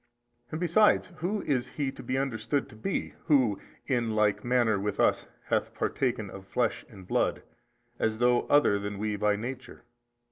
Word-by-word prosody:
A. - - -19
And - - -3
besides 180 +4 +3
who 190 +6 -2
is 130 -4 0
he 140 -3 -3
to - - -10
be 130 - -2
understood 135 0 -1
to - - -13
be 110 - -3
who 125 -10 +3 0.3
in 120 -5 0
like 105 -1 +2
manner 120 -4 +2
with 100 0 -3
us - - +2 0.2
hath - - -1
partaken 120 -5 -1
of 95 0 -11
blood 120 -2 0
and 95 -6 -13
flesh, - - 0 0.6
as 110 -1 0
though 120 +1 +3
other 145 -8 +4
than 100 0 -4
we 105 +1 -1
by 105 0 +2
nature? 125 +5 -7
120 Hz, 175 wpm, -29 LUFS, 105-135 Hz, 0.6 s, other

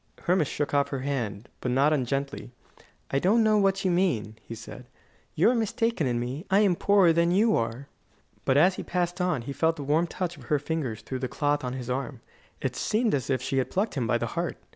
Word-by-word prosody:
Hermas 175 -4 +2
shook 145 0 -3
off 140 0 +3
her 135 -2 -3
hand, 120 -6 -3
but 125 - -3
not 140 +5 +3
ungently. 140 0 -2 0.6
"I 135 - +2
don't 215 +8 +3
know 215 -1 +4
what 195 -1 +1
you 185 - +3
mean," 170 - 0
he 115 - -8
said. 120 +2 -10 0.5
"You 180 +9 +4
are - - +1
mistaken 225 - 0
in 120 -1 0
me. 125 +6 -4
I 195 +2 +4
am 195 -4 +3
poorer 195 -3 +4
than 170 +1 +3
you 210 +5 +3
are." 115 +4 -2 0.6
But 130 - +2
as 185 +5 +4
he - - -4
passed 175 0 -2
on, 175 -9 0
he 140 - -5
felt 160 +3 +1
the 145 - -6
warm 155 +5 +2
touch 175 -1 -4
of 130 - -13
her 150 - +2
fingers 145 -6 -3
through 130 - -4
the 130 - -2
cloth 145 +2 0
on 125 -1 -3
his 130 -2 -6
arm. 130 -1 -3 0.4
It - - -2
seemed 220 +1 0
as 135 -3 -1
if 130 -2 0
she 135 0 0
had 130 - -1
plucked 205 +4 -1
him 125 -5 -1
by - - +2
the - - -2
heart. - - -2
145 Hz, 230 wpm, -27 LUFS, 130-180 Hz, 0.6 s, know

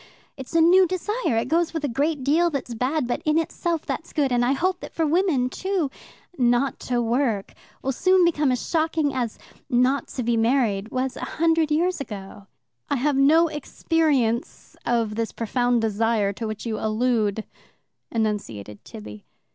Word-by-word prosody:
It's 265 +4 -9
a 330 - +5
new 365 +3 +6
desire. 370 - -1
It 230 +2 0
goes 335 +3 +1
with 320 - -2
a - - +1
great 285 +3 -1
deal 325 +6 +3
that's 275 -5 -4
bad, 255 +5 0
but 245 - -2
in 305 0 +2
itself 330 0 -1
it's 330 - -4
good, 285 -4 +1
and 245 0 +2
I 250 +3 +2
hope 365 +5 0
that - - -10
for 325 - +1
women, 310 -5 +2
too, 365 0 -2 0.5
'not 245 +2 +2
to 245 -1 +1
work' 235 -3 0 0.3
will 270 - 0
soon 370 +6 +3
become 300 -5 +2
as 250 - -2
shocking 315 -3 +1
as 245 -4 -2 0.3
'not 255 +2 +2
to 255 - -4
be 235 0 +1
married' 225 -4 +1
was 255 +1 -2
a - - -6
hundred 325 -1 +3
years 340 +2 +1
ago." 200 -4 -8 0.4
"I - - +1
have 280 +2 +1
no 310 +5 +5
experience 295 -5 -1
of 230 -3 +1
this 225 +1 -2
profound 245 +1 0
desire 220 -1 +1
to 225 +3 -5
which 215 +1 -6
you 220 -2 -2
allude," 220 -1 0 0.7
enunciated 195 - -3
Tibby. 105 -1 -10
260 Hz, 170 wpm, -24 LUFS, 230-320 Hz, 0.7 s, new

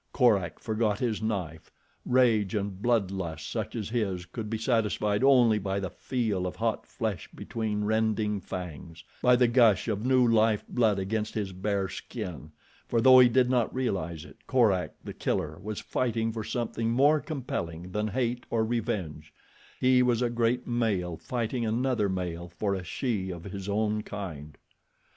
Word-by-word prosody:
Korak 105 -9 +3
forgot 110 -2 0
his 115 -2 -1
knife. 90 -8 -3 0.4
Rage 115 -6 +3
and 100 -2 -3
bloodlust 95 -9 -1
such - - -3
as 110 -3 -3
his 100 -7 -1
could 105 +4 -6
be 110 - -1
satisfied 110 -2 +1
only 125 -5 +5
by 95 0 -2
the 95 -2 -4
feel 110 -8 -2
of 90 - -5
hot 115 -1 -2
flesh 110 -7 -4
between 105 -2 -3
rending 110 -1 +1
fangs, 85 -3 -7 0.2
by 125 0 +5
the 125 0 +4
gush 115 -5 +4
of 105 -1 -1
new 130 -1 +4
life 110 -2 +3
blood 110 -5 +2
against 105 +3 -2
his 100 -3 -2
bare 100 +1 -1
skin, 85 -4 -7 0.4
for, 115 - +1
though 130 +2 +8
he 125 -1 +7
did 125 +1 +3
not 125 -3 +1
realize 85 -10 -2
it, - - -15
Korak, 110 -9 +2
The - - -7
Killer, 80 +1 -2
was 105 0 -5
fighting 115 -2 -1
for 110 -1 -4
something 115 -1 -2
more 140 +6 +4
compelling 90 - -5
than 105 +2 -1
hate 120 +2 -2
or 110 -1 +1
revenge—he 110 - -2
was 125 -1 +2
a 120 - 0
great 120 +1 +1
male 105 -8 0
fighting 120 +5 -3
another 115 -1 +1
male 90 -2 -3
for 100 +3 -2
a 95 -2 -3
she 95 +1 -2
of 85 -2 -6
his 100 0 -6
own 105 +1 0
kind. 80 -9 -7
110 Hz, 160 wpm, -28 LUFS, 95-120 Hz, 0.4 s, though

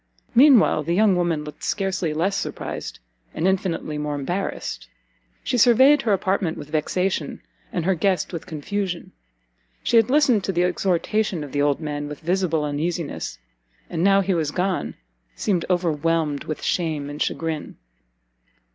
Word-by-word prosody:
Mean 265 +2 +8
while 155 - +2
the 170 +3 -1
young 205 -1 +4
woman 170 -4 0
looked 150 -1 -10
scarcely 190 -4 -1
less 175 +6 0
surprised, - - -5 0.4
and 170 - +1
infinitely 180 -5 -1
more 150 0 -2
embarrassed. 145 - -4 0.6
She 245 - 0
surveyed 260 +5 +6
her 230 - 0
apartment 190 -3 0
with 150 0 -9
vexation, 160 +1 -1 0.3
and 170 -3 -2
her 190 - +3
guest 185 +2 0
with 170 - -6
confusion; 180 +3 -4 0.7
she 235 - +3
had 225 +1 +4
listened 265 -7 +4
to - - 0
the 175 -1 +1
exhortation 180 0 0
of 145 - -8
the 145 - 0
old 145 -1 +2
man 145 -2 -4
with 150 -1 -8
visible 170 -2 0
uneasiness, 155 +2 -3 0.5
and 165 -1 -1
now 195 0 +5
he 195 0 0
was 160 -4 0
gone, 185 +3 -1 0.4
seemed 180 -5 0
overwhelmed 165 -4 0
with 155 - -5
shame 155 -5 -1
and 145 +1 -7
chagrin. 160 -2 -3
175 Hz, 155 wpm, -23 LUFS, 155-195 Hz, 0.7 s, Mean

